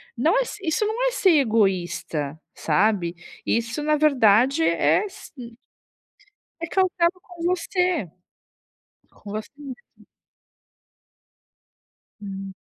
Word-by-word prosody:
não 320 Hz, -, +2 dB
é -, -, +4 dB
s 445 Hz, -, -8 dB
isso, 355 Hz, +4 st, 0 dB
não 475 Hz, +4 st, 0 dB
é -, -, +1 dB
ser 390 Hz, -7 st, +3 dB
egoísta, 175 Hz, -, 0 dB
sabe. 180 Hz, +1 st, +1 dB, 0.3 s
Isso, 235 Hz, +5 st, -1 dB
na 305 Hz, +1 st, +2 dB
verdade, 255 Hz, -, +4 dB
é 170 Hz, -, +3 dB
s 395 Hz, 0 st, -11 dB
hum 235 Hz, -3 st, -10 dB, 1.1 s
É 335 Hz, -, -2 dB
cautela 365 Hz, -1 st, +2 dB
com 350 Hz, -2 st, -11 dB
você. 360 Hz, -, 0 dB, 1.0 s
Com 200 Hz, -, -12 dB
você 215 Hz, +1 st, -5 dB
mesma. 290 Hz, -, -12 dB, 2.2 s
Hum. 195 Hz, -1 st, -7 dB
255 Hz, 110 wpm, -23 LUFS, -, 2.2 s, é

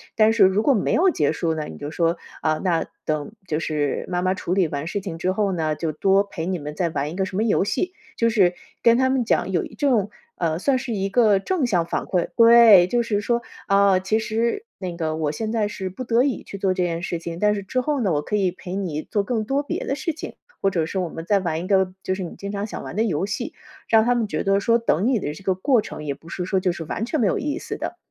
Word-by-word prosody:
但 215 Hz, 0 st, +5 dB
是 225 Hz, -3 st, +4 dB
如 190 Hz, +2 st, +3 dB
果 275 Hz, +5 st, +4 dB
没 205 Hz, -, 0 dB
有 375 Hz, +3 st, +4 dB
结 150 Hz, -, +1 dB
束 160 Hz, 0 st, -1 dB
呢， 155 Hz, -1 st, -3 dB
你 -, -, -9 dB
就 145 Hz, -, -5 dB
说： 165 Hz, +2 st, 0 dB, 0.2 s
“啊， 155 Hz, -1 st, +1 dB
那 175 Hz, -4 st, +1 dB, 0.2 s
等 155 Hz, +1 st, -2 dB, 0.2 s
就 155 Hz, -2 st, -1 dB
是 150 Hz, -3 st, -1 dB
妈 180 Hz, -1 st, -1 dB
妈 185 Hz, +1 st, +1 dB
处 180 Hz, -1 st, -3 dB
理 185 Hz, -3 st, +3 dB
完 145 Hz, -1 st, -4 dB
事 200 Hz, +4 st, -3 dB
情 180 Hz, -4 st, -6 dB
之 180 Hz, +3 st, 0 dB
后 200 Hz, +1 st, 0 dB
呢， 160 Hz, -4 st, -1 dB
就 160 Hz, 0 st, -2 dB
多 195 Hz, +6 st, +3 dB
陪 175 Hz, -5 st, -6 dB
你 185 Hz, 0 st, -2 dB
们 150 Hz, 0 st, -7 dB
再 175 Hz, 0 st, 0 dB
玩 145 Hz, -2 st, -2 dB
一 -, -, -7 dB
个 190 Hz, 0 st, 0 dB
什 185 Hz, -, -7 dB
么 215 Hz, -, +2 dB
游 220 Hz, -4 st, +2 dB
戏。” 365 Hz, -, -1 dB, 0.2 s
就 230 Hz, -, +2 dB
是 195 Hz, -6 st, +3 dB, 0.3 s
跟 235 Hz, 0 st, +6 dB
他 260 Hz, 0 st, +3 dB
们 260 Hz, -2 st, +1 dB
讲 220 Hz, -, +1 dB
有 175 Hz, -, +1 dB
一 -, -, -12 dB
这 285 Hz, -, +1 dB
种， 210 Hz, -6 st, +2 dB, 0.3 s
呃， 160 Hz, -2 st, 0 dB
算 265 Hz, +6 st, +2 dB
是 240 Hz, -2 st, -4 dB
一 195 Hz, -1 st, -1 dB
个 210 Hz, -2 st, +4 dB
正 330 Hz, -, 0 dB
向 180 Hz, -8 st, +1 dB
反 -, -, -2 dB
馈。 180 Hz, -2 st, 0 dB
对， 230 Hz, -6 st, +8 dB
就 240 Hz, +5 st, +1 dB
是 215 Hz, -3 st, 0 dB
说， 235 Hz, +3 st, 0 dB, 0.3 s
啊， 200 Hz, -2 st, +4 dB
其 205 Hz, +4 st, 0 dB
实 230 Hz, -, -1 dB
那 180 Hz, -3 st, -5 dB
个 160 Hz, -2 st, -2 dB
我 155 Hz, -2 st, 0 dB
现 215 Hz, +7 st, -3 dB
在 220 Hz, -2 st, +1 dB
是 190 Hz, -2 st, -5 dB
不 190 Hz, +8 st, -7 dB
得 235 Hz, +1 st, +3 dB
已 275 Hz, -2 st, -1 dB
去 200 Hz, -, -8 dB
做 195 Hz, -1 st, +1 dB
这 185 Hz, -, -2 dB
件 170 Hz, -1 st, -2 dB
事 175 Hz, -2 st, -2 dB
情， 165 Hz, 0 st, -6 dB
但 210 Hz, +1 st, +3 dB
是 200 Hz, -, -3 dB
之 255 Hz, +6 st, -1 dB
后 295 Hz, +1 st, -1 dB
呢， 200 Hz, -5 st, +1 dB
我 145 Hz, -, +1 dB
可 210 Hz, -, -3 dB
以 190 Hz, -3 st, +1 dB
陪 180 Hz, +1 st, -7 dB
你 175 Hz, -6 st, -2 dB
做 205 Hz, -, -1 dB
更 220 Hz, +1 st, -1 dB
多 275 Hz, +5 st, 0 dB
别 -, -, -4 dB
的 275 Hz, -, -1 dB
事 325 Hz, +3 st, -2 dB
情， -, -, -8 dB, 0.3 s
或 195 Hz, -, +3 dB
者 170 Hz, -4 st, 0 dB
是 175 Hz, -, -5 dB
我 180 Hz, -2 st, -2 dB
们 165 Hz, +1 st, -7 dB
再 200 Hz, +2 st, +3 dB
玩 165 Hz, -4 st, -2 dB
一 -, -, -6 dB
个 190 Hz, -2 st, +2 dB
就 185 Hz, -, -1 dB
是 190 Hz, -, -4 dB
你 170 Hz, -, -7 dB
经 200 Hz, 0 st, -5 dB
常 200 Hz, 0 st, -2 dB
想 -, -, -6 dB
玩 -, -, -7 dB
的 220 Hz, -, +2 dB
游 190 Hz, -5 st, 0 dB
戏。 205 Hz, -, -4 dB, 0.4 s
让 220 Hz, -1 st, +6 dB
他 245 Hz, 0 st, +3 dB
们 235 Hz, -2 st, +1 dB
觉 -, -, -2 dB
得 195 Hz, 0 st, +3 dB
说， 230 Hz, +3 st, +3 dB
等 215 Hz, -5 st, +1 dB
你 255 Hz, -4 st, +2 dB
的 150 Hz, -, -3 dB
这 175 Hz, -, -12 dB
个 190 Hz, -, +2 dB
过 240 Hz, +5 st, +2 dB
程， 155 Hz, -, -8 dB
也 140 Hz, -, -1 dB
不 165 Hz, +4 st, -16 dB
是 180 Hz, +1 st, -4 dB
说 190 Hz, +1 st, +1 dB
就 185 Hz, -1 st, +1 dB
是 170 Hz, -, -6 dB
完 190 Hz, -, -3 dB
全 305 Hz, +6 st, -2 dB
没 220 Hz, -, +3 dB
有 -, -, +1 dB
意 295 Hz, +1 st, -2 dB
思 -, -, -5 dB
的。 -, -, -5 dB
195 Hz, 305 characters per minute, -23 LUFS, 170-225 Hz, 0.4 s, 对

